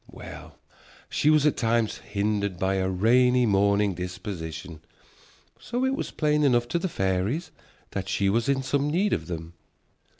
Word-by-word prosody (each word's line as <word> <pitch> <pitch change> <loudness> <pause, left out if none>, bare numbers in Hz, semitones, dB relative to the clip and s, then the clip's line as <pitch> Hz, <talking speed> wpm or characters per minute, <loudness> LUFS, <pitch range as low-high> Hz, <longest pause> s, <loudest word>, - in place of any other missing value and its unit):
Well, - - -11 0.5
she 150 - +2
was 155 -1 +4
at 150 - +2
times 115 -1 +1
hindered 100 -2 -2
by 95 +1 0
a 95 0 0
rainy 125 +6 +4
mornin' 100 -1 +3
disposition. 85 -3 -6 0.8
So 245 +2 -2
it 265 - +1
was - - -3
plain 150 -1 +1
enough 120 -4 +3
to 170 - 0
the 185 - -2
fairies 100 - -1 0.4
that 95 -1 -4
she 100 0 +1
was 115 +6 +1
in 135 -1 +1
some 140 +2 0
need 190 +6 +1
of - - -2
them. 85 -1 -6
105 Hz, 160 wpm, -26 LUFS, 95-140 Hz, 0.8 s, was